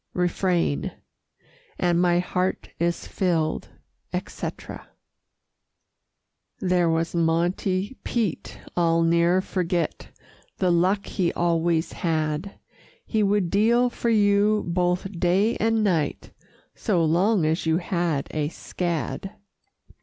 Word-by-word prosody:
Refrain 175 Hz, -, 0 dB, 0.8 s
And 175 Hz, -1 st, +2 dB
my 175 Hz, -1 st, +3 dB
heart 180 Hz, +1 st, -1 dB
is 170 Hz, 0 st, -1 dB
filled, 165 Hz, -5 st, -1 dB, 0.4 s
etc. -, -, -6 dB, 1.7 s
There 180 Hz, -2 st, +2 dB
was 165 Hz, 0 st, 0 dB
Monte 175 Hz, +6 st, 0 dB
Pete 220 Hz, -8 st, -2 dB, 0.2 s
I'll 165 Hz, -1 st, +3 dB
ne'er 170 Hz, +2 st, +3 dB
forget 180 Hz, -2 st, -2 dB, 0.5 s
The 185 Hz, -2 st, +2 dB
luck 185 Hz, +4 st, +2 dB
he 175 Hz, -3 st, 0 dB
always 170 Hz, -1 st, +1 dB
had. 160 Hz, +2 st, -2 dB, 0.5 s
He 220 Hz, -, 0 dB
would 200 Hz, -4 st, +1 dB
deal 235 Hz, +4 st, +3 dB
for 235 Hz, -, -2 dB
you 210 Hz, -1 st, +3 dB
both 180 Hz, +1 st, -1 dB
day 190 Hz, +6 st, +2 dB
and 225 Hz, 0 st, +1 dB
night, 165 Hz, -8 st, 0 dB, 0.4 s
So 180 Hz, -7 st, +1 dB
long 180 Hz, +3 st, +2 dB
as 160 Hz, +1 st, 0 dB
you 160 Hz, 0 st, +3 dB
had 170 Hz, -5 st, -1 dB
a 150 Hz, -1 st, -1 dB
scad. 170 Hz, +1 st, -4 dB
175 Hz, 105 wpm, -24 LUFS, 165-195 Hz, 1.7 s, my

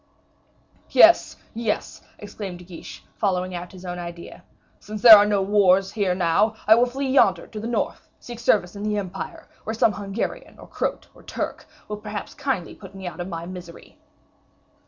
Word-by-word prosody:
"Yes, 330 Hz, +6 st, +6 dB, 0.2 s
yes," 225 Hz, -2 st, -3 dB, 0.2 s
exclaimed 200 Hz, -3 st, -7 dB
De 180 Hz, -, -13 dB
Guiche, 175 Hz, -2 st, -11 dB
following 185 Hz, -3 st, -1 dB
out 175 Hz, 0 st, -6 dB
his 185 Hz, -1 st, -12 dB
own 180 Hz, 0 st, -5 dB
idea; 170 Hz, 0 st, -9 dB, 0.4 s
"since 210 Hz, -1 st, -8 dB
there 230 Hz, -3 st, +12 dB
are 205 Hz, 0 st, +5 dB
no 205 Hz, -2 st, +1 dB
wars 195 Hz, -1 st, +3 dB
here 195 Hz, -5 st, 0 dB
now, 190 Hz, +5 st, +2 dB
I 215 Hz, -, +7 dB
will 240 Hz, +2 st, +4 dB
flee 270 Hz, +2 st, -3 dB
yonder 265 Hz, -, +3 dB
to 215 Hz, -, -8 dB
the 220 Hz, -, -5 dB
north, 240 Hz, -, -3 dB
seek 240 Hz, -1 st, -9 dB
service 205 Hz, -5 st, +1 dB
in 200 Hz, -, -7 dB
the 210 Hz, 0 st, -1 dB
Empire, 195 Hz, -1 st, -6 dB, 0.2 s
where 220 Hz, -, -4 dB
some 220 Hz, 0 st, +3 dB
Hungarian, 200 Hz, +2 st, -5 dB
or -, -, -12 dB
Croat, -, -, -4 dB
or -, -, -18 dB
Turk, -, -, -5 dB, 0.2 s
will 210 Hz, -, -5 dB
perhaps 210 Hz, -1 st, -7 dB
kindly 255 Hz, -, -3 dB
put 195 Hz, -1 st, -13 dB
me 190 Hz, -1 st, -9 dB
out 180 Hz, -, -7 dB
of 175 Hz, -, -4 dB
my 170 Hz, -2 st, -6 dB
misery." 180 Hz, -1 st, -11 dB
200 Hz, 180 wpm, -23 LUFS, 180-215 Hz, 0.4 s, there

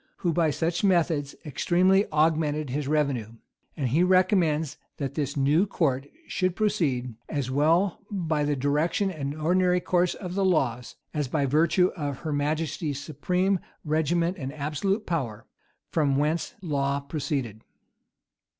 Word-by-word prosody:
who 170 Hz, -, +3 dB
by 165 Hz, -1 st, +2 dB
such 165 Hz, +4 st, -1 dB
methods 165 Hz, -7 st, +2 dB
extremely 185 Hz, +7 st, +2 dB
augmented 155 Hz, -2 st, +1 dB
his 145 Hz, +1 st, -2 dB
revenue; 140 Hz, -7 st, 0 dB, 0.4 s
and 135 Hz, -5 st, 0 dB
he 150 Hz, +8 st, +2 dB
recommends 180 Hz, -5 st, +3 dB, 0.2 s
that 140 Hz, -2 st, -3 dB
this 145 Hz, -1 st, -2 dB
new 150 Hz, +8 st, +3 dB
court 140 Hz, -7 st, 0 dB, 0.2 s
should 185 Hz, -2 st, -1 dB
proceed, 155 Hz, -, 0 dB, 0.2 s
"as 140 Hz, -4 st, -2 dB
well 165 Hz, +7 st, +2 dB
by 160 Hz, -7 st, -1 dB
the 145 Hz, 0 st, +1 dB
direction 150 Hz, +8 st, +1 dB
and 145 Hz, -4 st, -4 dB
ordinary 180 Hz, +3 st, +2 dB
course 180 Hz, 0 st, +1 dB
of 180 Hz, -2 st, -6 dB
the 195 Hz, +1 st, 0 dB
laws, 130 Hz, -10 st, 0 dB, 0.2 s
as 150 Hz, -3 st, -1 dB
by 140 Hz, +2 st, 0 dB
virtue 165 Hz, +6 st, +3 dB
of 145 Hz, -5 st, -4 dB
her 155 Hz, -2 st, -2 dB
majesty's 150 Hz, 0 st, -1 dB
supreme 180 Hz, +6 st, 0 dB, 0.3 s
regiment 165 Hz, +4 st, +1 dB
and 135 Hz, -1 st, -4 dB
absolute 175 Hz, +9 st, -1 dB
power, 120 Hz, -10 st, -3 dB, 0.5 s
from 145 Hz, -4 st, +2 dB
whence 155 Hz, +3 st, 0 dB
law 140 Hz, -3 st, 0 dB
proceeded." 140 Hz, -6 st, -3 dB
155 Hz, 140 wpm, -26 LUFS, 140-175 Hz, 0.5 s, who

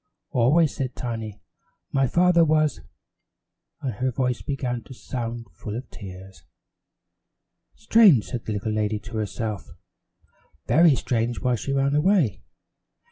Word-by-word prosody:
"Always," 145 Hz, +6 st, +3 dB
said 130 Hz, -2 st, -3 dB
Tiny, 115 Hz, -4 st, -5 dB, 0.5 s
"my 135 Hz, -1 st, +2 dB
father 175 Hz, +3 st, +4 dB
was 155 Hz, -1 st, +2 dB, 0.5 s
" -, -, -56 dB
and 130 Hz, -4 st, -2 dB
her 125 Hz, +6 st, -1 dB
voice 125 Hz, -1 st, -1 dB
began 125 Hz, -4 st, -3 dB
to 130 Hz, -, -11 dB
sound 120 Hz, -2 st, -5 dB
full 105 Hz, +5 st, -7 dB
of 125 Hz, +3 st, -7 dB
tears. 95 Hz, -1 st, -11 dB, 1.3 s
"Strange," 215 Hz, -, +5 dB
said 120 Hz, -3 st, -6 dB
the 110 Hz, -, -2 dB
little 105 Hz, +1 st, -2 dB
lady 105 Hz, 0 st, 0 dB
to 115 Hz, +2 st, -8 dB
herself. 105 Hz, -1 st, -4 dB, 1.0 s
"Very 165 Hz, -2 st, +5 dB
strange 120 Hz, -1 st, -1 dB
why 125 Hz, -1 st, +1 dB
she 120 Hz, +4 st, -3 dB
ran 140 Hz, 0 st, +1 dB
away. 150 Hz, -, +2 dB
125 Hz, 135 wpm, -24 LUFS, 110-140 Hz, 1.3 s, Strange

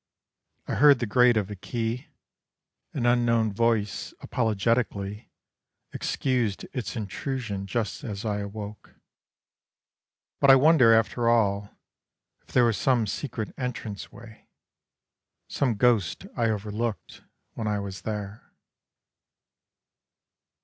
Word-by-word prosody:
I -, -, -2 dB
heard 145 Hz, 0 st, +6 dB
the 120 Hz, -, -2 dB
grate 120 Hz, +2 st, +4 dB
of 105 Hz, -1 st, -1 dB
a -, -, -5 dB
key, 115 Hz, +5 st, -3 dB, 0.8 s
An 120 Hz, -, -2 dB
unknown 115 Hz, -3 st, +2 dB
voice 115 Hz, -1 st, 0 dB
apologetically 110 Hz, -2 st, -1 dB, 0.6 s
Excused 120 Hz, -7 st, -1 dB
its 125 Hz, -2 st, -4 dB
intrusion 105 Hz, -1 st, -4 dB
just 110 Hz, +2 st, -3 dB
as 105 Hz, -2 st, -5 dB
I 105 Hz, -1 st, -1 dB
awoke. 105 Hz, +1 st, -8 dB, 1.4 s
But 140 Hz, -, +4 dB
I 135 Hz, -, +10 dB
wonder 135 Hz, -4 st, +6 dB
after 115 Hz, +1 st, +3 dB
all 100 Hz, -3 st, +1 dB, 0.6 s
If -, -, -38 dB
there 125 Hz, -, +3 dB
was 115 Hz, -4 st, +1 dB
some 125 Hz, -4 st, +2 dB
secret 110 Hz, 0 st, -4 dB
entranceway, 115 Hz, -2 st, -7 dB, 1.0 s
Some 125 Hz, -5 st, 0 dB
ghost 110 Hz, -6 st, +2 dB
I 115 Hz, -1 st, +1 dB
overlooked, 110 Hz, +1 st, -3 dB, 0.3 s
when 110 Hz, -, -4 dB
I 105 Hz, -1 st, 0 dB
was 100 Hz, -3 st, -6 dB
there. 105 Hz, 0 st, -6 dB
115 Hz, 110 wpm, -26 LUFS, 105-120 Hz, 1.4 s, I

